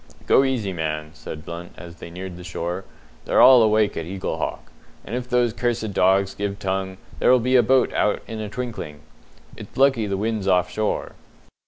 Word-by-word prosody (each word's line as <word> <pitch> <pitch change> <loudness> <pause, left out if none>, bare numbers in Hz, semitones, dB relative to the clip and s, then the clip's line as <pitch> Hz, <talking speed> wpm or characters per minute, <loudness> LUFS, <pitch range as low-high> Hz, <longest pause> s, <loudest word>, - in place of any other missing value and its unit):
"Go 135 - +5
easy, 120 -8 -1
man," 75 -2 -3
said 75 -1 -9
Blunt, 85 +1 -8
as 85 -1 -11
they 85 - -9
neared 90 +1 -7
the 90 - -10
shore. 90 +2 -4 0.4
"They're - - +2
all 130 -2 +9
awake 110 -1 +3
at 80 - -4
Eaglehawk; 95 +1 -3 0.4
and 110 - -8
if 125 0 -4
those 120 -2 +2
cursed 110 -3 -2
dogs 95 +1 +3
give 100 0 -3
tongue 95 -1 -3 0.2
there'll 130 - +5
be 125 +2 +1
a 125 - +7
boat 130 +1 +2
out 105 - +1
in 110 - -6
a 105 -1 -4
twinkling. 115 -12 -6 0.5
It's - - -12
lucky 135 -5 +3
the 100 -1 -2
wind's 110 -1 -2
off 90 -1 +2
shore." 110 0 -2
100 Hz, 185 wpm, -23 LUFS, 90-115 Hz, 0.5 s, all